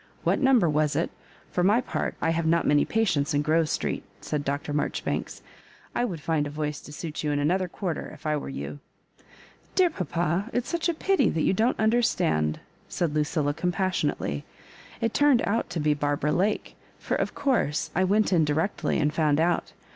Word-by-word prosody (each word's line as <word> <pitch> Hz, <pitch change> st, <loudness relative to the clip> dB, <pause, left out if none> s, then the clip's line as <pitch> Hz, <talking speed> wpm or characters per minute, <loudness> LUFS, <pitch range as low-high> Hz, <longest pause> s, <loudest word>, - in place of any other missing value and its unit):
What -, -, +2 dB
number 260 Hz, -9 st, +5 dB
was 150 Hz, -1 st, +1 dB
it? -, -, 0 dB, 0.4 s
For 180 Hz, -, 0 dB
my 205 Hz, +6 st, +5 dB
part, 255 Hz, -, -3 dB
I 165 Hz, -, +3 dB
have 165 Hz, 0 st, 0 dB
not 170 Hz, +1 st, +3 dB
many 145 Hz, 0 st, +4 dB
patients 160 Hz, -10 st, +1 dB
in 145 Hz, -, +2 dB
Grove 155 Hz, +1 st, +2 dB
Street," -, -, -1 dB, 0.2 s
said 150 Hz, -1 st, -3 dB
Dr. 145 Hz, +1 st, -2 dB
Marjoribanks. 145 Hz, -, -2 dB, 0.3 s
" -, -, -27 dB
I 245 Hz, -, +2 dB
would 180 Hz, -9 st, -4 dB
find 155 Hz, -2 st, 0 dB
a -, -, -5 dB
voice 150 Hz, 0 st, -3 dB
to -, -, -12 dB
suit 150 Hz, +1 st, -5 dB
you 150 Hz, -, 0 dB
in 145 Hz, -, +1 dB
another 180 Hz, +6 st, +1 dB
quarter, 175 Hz, -2 st, -4 dB
if 155 Hz, -, -14 dB
I 155 Hz, 0 st, +1 dB
were 145 Hz, -, -4 dB
you." 145 Hz, -, -6 dB, 0.5 s
" -, -, -26 dB
Dear 365 Hz, -3 st, +4 dB
papa, 175 Hz, -, -1 dB
it's 245 Hz, -1 st, -1 dB
such 340 Hz, 0 st, 0 dB
a 340 Hz, -, 0 dB
pity 390 Hz, +4 st, +2 dB
that 160 Hz, -, 0 dB
you -, -, +3 dB
don't 225 Hz, +6 st, +1 dB
understand," 220 Hz, -, +2 dB, 0.3 s
said 170 Hz, -4 st, -1 dB
Lucilla, 150 Hz, -1 st, 0 dB
compassionately. 175 Hz, -, -1 dB, 0.3 s
" -, -, -20 dB
It 230 Hz, -, 0 dB
turned 290 Hz, -4 st, +4 dB
out 225 Hz, +3 st, 0 dB
to 170 Hz, -, -3 dB
be 150 Hz, 0 st, +2 dB
Barbara 145 Hz, 0 st, 0 dB
Lake; 205 Hz, +6 st, 0 dB, 0.2 s
for, -, -, -4 dB
of -, -, -1 dB
course, 255 Hz, -, 0 dB
I 185 Hz, -, +2 dB
went 205 Hz, +2 st, +2 dB
in 165 Hz, -3 st, +4 dB
directly, 155 Hz, +6 st, 0 dB
and 150 Hz, -1 st, +1 dB
found 155 Hz, -2 st, +2 dB
out. 170 Hz, +2 st, +1 dB
165 Hz, 200 wpm, -26 LUFS, 150-205 Hz, 0.5 s, number